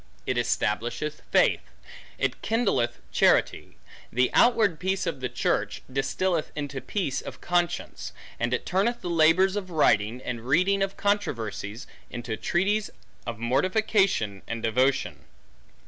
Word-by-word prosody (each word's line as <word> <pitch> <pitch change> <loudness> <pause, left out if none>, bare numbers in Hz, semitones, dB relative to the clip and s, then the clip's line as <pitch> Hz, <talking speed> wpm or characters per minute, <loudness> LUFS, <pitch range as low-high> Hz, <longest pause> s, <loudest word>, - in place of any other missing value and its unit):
It 130 - 0
establisheth 120 +5 -1
faith; - - +4 0.6
it - - -1
kindleth 205 - +1
charity; - - +2 0.3
the 125 +2 +2
outward 220 -9 +4
peace 190 +1 -1
of - - -3
the 125 -1 -3
church, - - -1
distilleth 160 +5 0
into 145 -2 -4
peace 185 -10 -2
of - - -9
conscience; 175 -1 -1 0.3
and 120 0 0
it 125 - -1
turneth 230 +6 0
the 175 - -3
labors 170 +4 +4
of 195 -3 -4
writing, 115 - +2
and 120 -2 -4
reading 185 +8 +3
of 195 0 -1
controversies, 115 - -2 0.2
into 120 -2 -4
treaties 200 - 0 0.4
of 115 - -4
mortification 185 - +1
and 115 -1 -4
devotion. 130 +4 +1
150 Hz, 130 wpm, -26 LUFS, 120-190 Hz, 0.6 s, faith